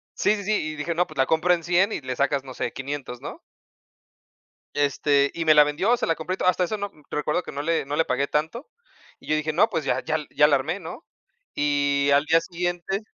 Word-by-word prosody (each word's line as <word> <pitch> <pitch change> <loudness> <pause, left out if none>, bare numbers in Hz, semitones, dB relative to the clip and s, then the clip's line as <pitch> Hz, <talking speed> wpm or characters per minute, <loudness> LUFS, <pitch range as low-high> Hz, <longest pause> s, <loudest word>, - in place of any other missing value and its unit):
sí, 210 - +2
sí, 200 - -6
sí, 215 +3 0
y 155 -6 -2
dije, 165 +3 -3
no, 175 +1 +2
pues, 155 - -13
la 130 - +3
compro 165 +5 +2
en 170 -2 -2
100 180 +4 +3
y - - -2
le 130 -1 -4
sacas, 140 0 0
no 130 - -8
sé, 120 - -3
500, 135 -3 -6
¿no? - - -8 1.3
Este, 140 0 +2
y 170 - -3
me 155 -1 +6
la 150 0 +8
vendió, 190 +12 +1
se - - -2
la 165 - +2
compré 165 +4 -4
y - - -6
todo. 185 - +1
Hasta 180 0 +2
eso 215 +4 -2
no, 205 0 -4 0.2
recuerdo 150 +4 -1
que - - -8
no 145 - -4
le 165 -2 0
no 145 +1 -3
le 165 - +3
pagué 135 +3 -1
tanto. 160 - -2 0.5
Y - - -18
yo 155 - +2
dije, 155 0 -1
no, 185 +7 +4
pues, 165 -8 -3
ya 125 0 0
ya 155 0 0
ya 150 0 +5
la 145 -2 +4
armé, 160 +8 -2
¿no? 180 - -9 0.5
Y 140 -1 +1
al 145 +1 +4
día 165 +1 +4
siguiente 175 +2 -3
155 Hz, 245 wpm, -24 LUFS, 140-175 Hz, 1.3 s, la